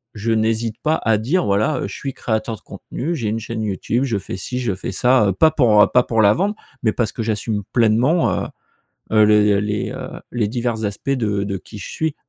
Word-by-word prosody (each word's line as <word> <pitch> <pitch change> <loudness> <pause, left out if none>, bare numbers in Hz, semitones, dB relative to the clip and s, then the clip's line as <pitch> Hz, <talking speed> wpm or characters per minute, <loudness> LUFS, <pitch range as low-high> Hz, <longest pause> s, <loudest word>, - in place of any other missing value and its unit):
je 110 +2 -2
n'hésite 110 0 0
pas 155 +1 +2
à 110 -1 +3
dire 160 +11 0
voilà, 105 +8 +1
heu, - - -2
je - - -8
suis 135 - -5
créateur 110 0 -2
de - - -22
contenu, 160 +7 -5
j'ai 115 -8 -2
une 110 - -1
chaîne 115 +1 -5
YouTube, 110 +5 -1
je 115 -6 -1
fais 95 - -6
ci, 125 +7 -5
je 120 -6 -1
fais 95 - -5
ça, 125 0 +3
pas 160 - +6
pour, 115 -9 +4
heu, - - +3
pas 125 - +6
pour 115 -2 +1
la 100 0 +6
vendre, 200 - 0 0.3
mais 110 - +3
parce 115 -4 -1
que - - -5
j'assume 110 -1 -2
pleinement, 120 - +3
heu - - -4 0.7
heu, 110 -1 +6
les 105 -1 +4
les, 105 0 -2
heu, - - -6 0.3
les 115 -4 0
divers 120 -1 -2
aspects 105 +7 -3
de 105 -6 0
de 100 -1 -3
qui 105 - -12
je - - -7
suis. 160 -2 -2
110 Hz, 230 wpm, -20 LUFS, 105-125 Hz, 0.7 s, pas